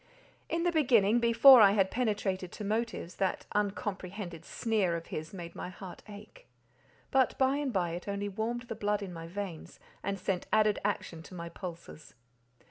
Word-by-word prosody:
In 335 Hz, +1 st, 0 dB
the 350 Hz, -, +2 dB
beginning, 240 Hz, -, +4 dB
before 235 Hz, +2 st, +8 dB
I 200 Hz, -1 st, +7 dB
had 195 Hz, -2 st, +2 dB
penetrated 205 Hz, -6 st, -1 dB
to 215 Hz, -, -7 dB
motives, 220 Hz, -3 st, -2 dB
that 190 Hz, -1 st, -1 dB
uncomprehended 195 Hz, -4 st, -3 dB
sneer 210 Hz, -7 st, 0 dB
of 165 Hz, 0 st, -5 dB
his 155 Hz, +1 st, -4 dB
made 170 Hz, -3 st, -8 dB
my -, -, -6 dB
heart 185 Hz, 0 st, -10 dB
ache, 210 Hz, -, -12 dB, 0.6 s
but 265 Hz, -1 st, +3 dB
by 265 Hz, +1 st, +3 dB
and 290 Hz, -3 st, -1 dB
by 180 Hz, -5 st, 0 dB
it 175 Hz, +3 st, -6 dB
only 200 Hz, 0 st, -2 dB
warmed 225 Hz, +4 st, -3 dB
the 235 Hz, -2 st, -6 dB
blood 210 Hz, -1 st, -1 dB
in 185 Hz, -2 st, -7 dB
my 165 Hz, -1 st, -7 dB
veins, 185 Hz, -2 st, -7 dB, 0.2 s
and 200 Hz, -, -2 dB
sent 185 Hz, -1 st, -2 dB
added 215 Hz, -1 st, +3 dB
action 185 Hz, -5 st, -2 dB
to 180 Hz, -, -12 dB
my 170 Hz, -1 st, -6 dB
pulses. 170 Hz, -3 st, -9 dB
200 Hz, 175 wpm, -31 LUFS, 180-225 Hz, 0.6 s, before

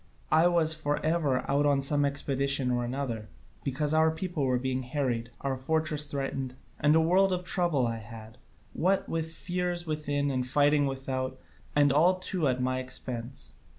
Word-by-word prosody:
I 160 Hz, +2 st, +6 dB
was 165 Hz, -2 st, +3 dB
for 145 Hz, -2 st, -1 dB
ever 155 Hz, -5 st, +1 dB
out 145 Hz, +1 st, +2 dB
on 140 Hz, -1 st, +2 dB
some 145 Hz, +1 st, +2 dB
expedition 140 Hz, -1 st, +1 dB
or 120 Hz, -1 st, 0 dB
other, 115 Hz, -6 st, -4 dB, 0.3 s
because 150 Hz, +2 st, 0 dB
our 160 Hz, 0 st, +4 dB
people 160 Hz, -2 st, -2 dB
were 125 Hz, -1 st, +2 dB
being 130 Hz, +1 st, -2 dB
harried, 125 Hz, -3 st, -2 dB
or 140 Hz, -, -1 dB
our 130 Hz, -, -2 dB
fortresses 155 Hz, +2 st, -1 dB
threatened, 135 Hz, -2 st, -3 dB, 0.2 s
and 150 Hz, +1 st, +4 dB
a -, -, +6 dB
world 185 Hz, +4 st, +3 dB
of 180 Hz, -1 st, -1 dB
trouble 175 Hz, -8 st, +1 dB
I 115 Hz, -1 st, -2 dB
had, 110 Hz, 0 st, -11 dB, 0.3 s
what 190 Hz, +3 st, +1 dB
with 160 Hz, 0 st, -2 dB
fears 175 Hz, 0 st, -3 dB
within 145 Hz, -2 st, -1 dB
and 130 Hz, -1 st, -1 dB
fighting 145 Hz, +2 st, +3 dB
without, 130 Hz, -1 st, -3 dB, 0.4 s
and 145 Hz, -1 st, +4 dB
all 170 Hz, +6 st, +5 dB
too 185 Hz, -3 st, -1 dB
at 130 Hz, -1 st, 0 dB
my 130 Hz, 0 st, 0 dB
own -, -, -3 dB
expense. 125 Hz, 0 st, -5 dB
145 Hz, 180 wpm, -29 LUFS, 130-160 Hz, 0.4 s, I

